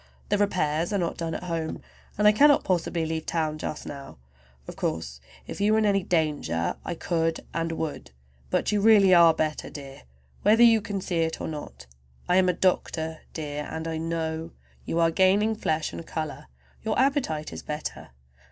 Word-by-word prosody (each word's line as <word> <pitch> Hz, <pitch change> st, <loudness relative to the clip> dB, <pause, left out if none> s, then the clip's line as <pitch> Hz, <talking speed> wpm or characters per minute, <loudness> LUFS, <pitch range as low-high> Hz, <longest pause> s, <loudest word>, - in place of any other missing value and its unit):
"The 205 Hz, -, +2 dB
repairs 170 Hz, -4 st, 0 dB
are 205 Hz, -, +1 dB
not 170 Hz, -3 st, -2 dB
done 165 Hz, -1 st, -3 dB
at -, -, -5 dB
home, 165 Hz, -3 st, -3 dB, 0.4 s
and 210 Hz, +1 st, +4 dB
I -, -, +9 dB
cannot 285 Hz, +6 st, +5 dB
possibly 175 Hz, -2 st, 0 dB
leave 160 Hz, 0 st, -3 dB
town 155 Hz, -2 st, -1 dB
just 150 Hz, -, -5 dB
now. 140 Hz, -1 st, -9 dB, 0.5 s
Of -, -, -8 dB
course 65 Hz, -6 st, -3 dB, 0.2 s
if -, -, -7 dB
you 210 Hz, +1 st, +3 dB
were -, -, +4 dB
in 220 Hz, -, +2 dB
any 200 Hz, -1 st, +3 dB
danger 145 Hz, -, 0 dB
I -, -, -4 dB
could 165 Hz, -1 st, -1 dB
and 165 Hz, 0 st, -1 dB
would, 160 Hz, -2 st, -4 dB, 0.4 s
but -, -, 0 dB
you 210 Hz, -1 st, +1 dB
really 200 Hz, -3 st, +6 dB
are 170 Hz, -1 st, +8 dB
better, 155 Hz, -1 st, -2 dB
dear, 140 Hz, -2 st, -10 dB, 0.4 s
whether 220 Hz, +3 st, +5 dB
you 225 Hz, -2 st, +6 dB
can 200 Hz, -1 st, -4 dB
see 175 Hz, -2 st, -2 dB
it 160 Hz, 0 st, -1 dB
or -, -, -4 dB
not. 145 Hz, -, -8 dB, 0.4 s
I 180 Hz, -, +3 dB
am 185 Hz, -1 st, +4 dB
a -, -, +3 dB
doctor, 160 Hz, -3 st, 0 dB, 0.2 s
dear, 150 Hz, -2 st, -4 dB
and 160 Hz, 0 st, -5 dB
I 160 Hz, -1 st, -2 dB
know. 160 Hz, 0 st, -3 dB, 0.3 s
You 165 Hz, -, -1 dB
are 165 Hz, 0 st, +4 dB
gaining 195 Hz, +5 st, +3 dB
flesh 160 Hz, -7 st, -2 dB
and -, -, -6 dB
color, 155 Hz, -, -5 dB, 0.4 s
your -, -, -1 dB
appetite 255 Hz, -, 0 dB
is -, -, -6 dB
better. 150 Hz, -, -6 dB
165 Hz, 190 wpm, -26 LUFS, 155-195 Hz, 0.5 s, I